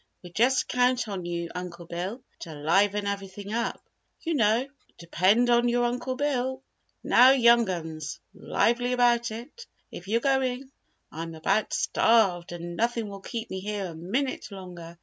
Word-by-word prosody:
We 175 - -11
just 250 +7 +2
count 250 -1 +1
on 190 -4 -5
you, 170 -1 -3
Uncle 175 -1 -7
Bill, 185 +9 -5 0.2
to 160 -2 -8
liven 195 +7 +2
everything 200 +1 -5
up, 235 +1 -3 0.4
you 330 - -1
know." 230 -1 +2 0.3
"Depend 190 +8 +2
upon 240 0 +3
your 240 0 +2
Uncle 250 +2 -2
Bill! 260 -1 -1 0.4
Now, 250 +2 +7
young 235 -4 +5
'uns 160 -3 -5
lively 245 +2 0
about 240 -1 +3
it, 240 - -9 0.2
if 175 - -9
you're 225 +3 +2
going! 265 0 0 0.4
I'm 165 +1 -6
about 195 +7 0
starved 190 -6 +2
and 175 0 -6
nothing 230 0 -1
will 200 -1 -9
keep 230 +2 -6
me 190 - -3
here 205 0 -3
a 175 - -6
minute 205 - -3
longer. 175 -3 -10
215 Hz, 155 wpm, -27 LUFS, 180-245 Hz, 0.4 s, Now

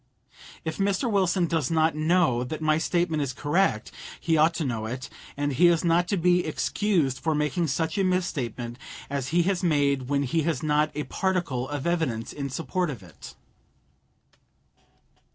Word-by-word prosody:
If 160 - -4
Mr. 200 +4 +1
Wilson 185 -3 +2
does 160 -5 0
not 160 0 +2
know 155 -6 +2
that 150 +5 -5
my 155 0 +2
statement 170 -2 0
is 135 -2 -2
correct, 145 - 0 0.3
he 165 - +1
ought 160 +2 +4
to 165 - -2
know 115 -4 -2
it, 125 +3 -6 0.3
and 145 0 -1
he 175 +7 +5
is 170 -1 +3
not 170 +1 +3
to 200 - 0
be 180 +1 +3
excused 160 -3 0
for 160 -1 0
making 150 +3 0
such 160 +5 -1
a - - +3
misstatement 130 - -2 0.3
as 140 -2 -2
he 170 +5 +2
has 190 0 0
made 140 -6 +1
when 140 0 +1
he 160 +5 0
has 155 -4 -1
not 150 0 +2
a 150 - -2
particle 175 -11 -1
of 145 -2 -4
evidence 160 -10 -1
in 140 -1 -4
support 170 +5 -2
of 120 -9 -7
it. 85 -3 -12
155 Hz, 170 wpm, -26 LUFS, 135-175 Hz, 0.3 s, he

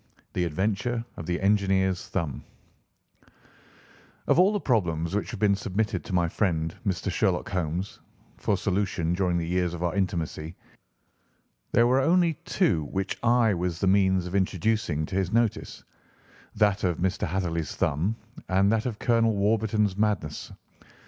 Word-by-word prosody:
THE 90 - 0
ADVENTURE 105 +8 -1
OF 85 - -8
THE 90 0 -1
ENGINEER'S 95 -2 +1
THUMB 80 -8 -3 1.8
Of - - +3
all 190 +3 +6
the 205 - 0
problems 85 - 0
which 105 - -1
have 115 - -6
been 100 -1 +4
submitted 100 +2 -2
to - - -6
my 85 -1 +2
friend, 80 -3 -1
Mr. 95 0 -1
Sherlock 95 -1 0
Holmes, 90 +1 -3 0.4
for - - 0
solution 95 -4 -1
during 90 -1 +1
the 85 - -1
years 90 0 0
of 85 - -5
our 85 - 0
intimacy, 85 -4 -2 1.2
there 115 - +4
were 130 +2 +3
only 170 +3 +3
two 125 - +1
which 95 +5 -3
I 120 -2 +3
was 90 -1 -2
the - - 0
means 95 -1 +3
of 90 - -6
introducing 95 -4 0
to 95 - -6
his 95 -1 0
notice—that 105 -2 -2
of 90 -3 +1
Mr. 95 +1 -1
Hatherley's 85 -2 -2
thumb, 85 +10 0 0.3
and 95 +2 +3
that 110 +1 +1
of 115 -4 -4
Colonel 115 -2 +2
Warburton's 105 -1 +1
madness. 105 -8 -1
95 Hz, 150 wpm, -26 LUFS, 85-110 Hz, 1.8 s, all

